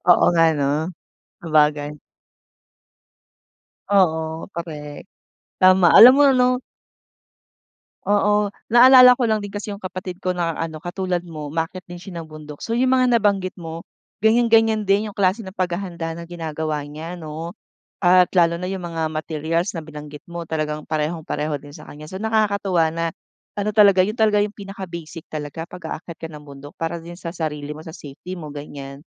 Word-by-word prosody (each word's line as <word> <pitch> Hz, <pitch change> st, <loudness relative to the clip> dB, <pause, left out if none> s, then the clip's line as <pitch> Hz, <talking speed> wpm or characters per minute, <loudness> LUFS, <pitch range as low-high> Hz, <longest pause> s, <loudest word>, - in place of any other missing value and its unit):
Oo 175 Hz, -, +6 dB
nga, 165 Hz, -1 st, +4 dB
'no? 140 Hz, -1 st, +1 dB, 0.7 s
Sabagay. 150 Hz, -2 st, +2 dB, 2.0 s
Oo, 160 Hz, -3 st, +1 dB
correct. 155 Hz, -3 st, -7 dB, 0.6 s
Tama, 185 Hz, -1 st, +6 dB
alam 245 Hz, +3 st, +11 dB
mo, -, -, +6 dB
ano? 255 Hz, -1 st, +3 dB, 1.4 s
Oo, 205 Hz, 0 st, +2 dB, 0.2 s
naalala 250 Hz, +1 st, +8 dB
ko 250 Hz, -, +1 dB
lang 220 Hz, -2 st, +1 dB
din 205 Hz, -, -6 dB
kasi 205 Hz, +1 st, -5 dB
yung 200 Hz, -, -10 dB
kapatid 185 Hz, 0 st, -6 dB
ko 185 Hz, -1 st, -1 dB
na 170 Hz, -2 st, -1 dB
ano, 160 Hz, -1 st, -4 dB
katulad 180 Hz, +1 st, -3 dB
mo, 155 Hz, -3 st, -7 dB
umaakyat 165 Hz, +4 st, -4 dB
din 175 Hz, -, -7 dB
siya 175 Hz, -2 st, -8 dB
ng 160 Hz, -, -12 dB
bundok. 150 Hz, -1 st, -11 dB
So, 230 Hz, +1 st, -2 dB
yung 255 Hz, +1 st, +3 dB
mga 255 Hz, -2 st, +4 dB
nabanggit 200 Hz, -3 st, 0 dB
mo, 165 Hz, -1 st, -7 dB, 0.4 s
ganiyan-ganiyan 225 Hz, -1 st, +3 dB
din 205 Hz, +2 st, +2 dB
yung 205 Hz, -, -14 dB
klase 195 Hz, +3 st, +2 dB
ng 190 Hz, -3 st, -9 dB
paghahanda 175 Hz, -3 st, -3 dB
ng 170 Hz, 0 st, -9 dB
ginagawa 155 Hz, -3 st, -4 dB
niya 160 Hz, +4 st, -8 dB
ano, 160 Hz, +1 st, -6 dB, 0.5 s
at 180 Hz, 0 st, +5 dB
lalo 170 Hz, 0 st, +3 dB
na 180 Hz, -, -3 dB
yung 190 Hz, -2 st, -4 dB
mga 165 Hz, -2 st, -2 dB
materials 160 Hz, +4 st, -2 dB
na 165 Hz, -, -4 dB
binanggit 150 Hz, -1 st, -10 dB
mo 170 Hz, 0 st, -6 dB
talagang 155 Hz, -1 st, -3 dB
parehong-pareho 155 Hz, -1 st, -2 dB
din 145 Hz, +1 st, -14 dB
sa -, -, -12 dB
kanya. 150 Hz, +1 st, -10 dB
So, 190 Hz, +4 st, -7 dB
nakakatuwa 200 Hz, -6 st, +1 dB
na 165 Hz, 0 st, -2 dB, 0.5 s
ano 210 Hz, +1 st, -1 dB
talaga, 200 Hz, -3 st, +6 dB
yun 210 Hz, -, -3 dB
talaga 220 Hz, -2 st, +3 dB
yung 205 Hz, 0 st, 0 dB
pinaka-basic 180 Hz, -5 st, -8 dB
talaga 155 Hz, +2 st, -5 dB
pag-aakyat 170 Hz, -1 st, -8 dB
ka 165 Hz, -, -4 dB
ng 150 Hz, -2 st, -11 dB
bundok 140 Hz, +1 st, -12 dB
para 165 Hz, +1 st, -3 dB
din 170 Hz, +1 st, -10 dB
sa 170 Hz, -2 st, -7 dB
sarili 150 Hz, -3 st, -4 dB
mo, 155 Hz, -, -10 dB
sa 160 Hz, -, -10 dB
safety 160 Hz, +4 st, -9 dB
mo, 155 Hz, -4 st, -8 dB
ganiyan. 140 Hz, -1 st, -9 dB
170 Hz, 165 wpm, -21 LUFS, 155-200 Hz, 2.0 s, alam